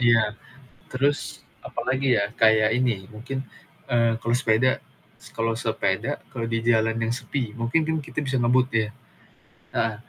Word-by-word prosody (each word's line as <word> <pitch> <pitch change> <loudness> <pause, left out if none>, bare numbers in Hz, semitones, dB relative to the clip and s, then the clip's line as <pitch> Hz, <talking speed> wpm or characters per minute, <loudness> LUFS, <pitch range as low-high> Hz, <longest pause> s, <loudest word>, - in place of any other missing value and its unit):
Iya, 115 -2 +5 0.7
terus 140 +3 0 0.3
apa - - -4
lagi, 135 +1 +1
ya, 100 - +2 0.2
kayak 110 -1 +6
ini 115 -7 0
mungkin, 125 +5 -5 0.5
eee, 115 -1 +3
kalau 115 +1 +1
sepeda 125 +1 +3 0.7
kalau 115 0 +1
sepeda 115 - -1 0.2
kalau 115 -1 -3
di 115 0 0
jalan 115 -1 +3
yang 115 0 0
sepi 125 -3 -3
mungkin 120 +7 +1
kan 160 - +1
kita - - -14 0.2
ngebut, 125 +2 +4
ya? 105 - -3 0.9
Heeh, 115 -1 +1
115 Hz, 145 wpm, -25 LUFS, 115-130 Hz, 0.9 s, kayak